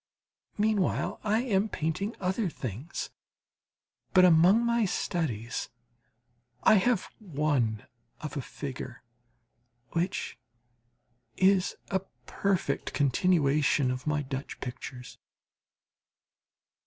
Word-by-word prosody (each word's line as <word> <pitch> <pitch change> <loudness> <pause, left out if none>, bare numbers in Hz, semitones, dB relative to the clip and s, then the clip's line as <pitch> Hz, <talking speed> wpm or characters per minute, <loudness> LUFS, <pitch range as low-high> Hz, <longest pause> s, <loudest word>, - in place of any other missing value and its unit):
Meanwhile 210 -2 +1
I 215 +2 +2
am 210 -3 +1
painting 180 +8 -2
other 190 +2 0
things. 130 - -5 1.0
But 185 -1 +8
among 180 +7 +6
my 235 -1 +2
studies 140 - -2 0.9
I - - +7
have 200 0 +1
one 145 - 0 0.3
of 155 -3 -6
a 140 - -1
figure 130 0 -7 0.9
which 175 +3 -2 1.0
is 190 0 +3 0.2
a 190 - +2 0.3
perfect 195 -2 -1
continuation 145 -2 +3
of 125 +3 -5
my 150 -1 +1
Dutch 135 +1 -5
pictures. 125 0 -7
160 Hz, 90 wpm, -29 LUFS, 135-195 Hz, 1.0 s, But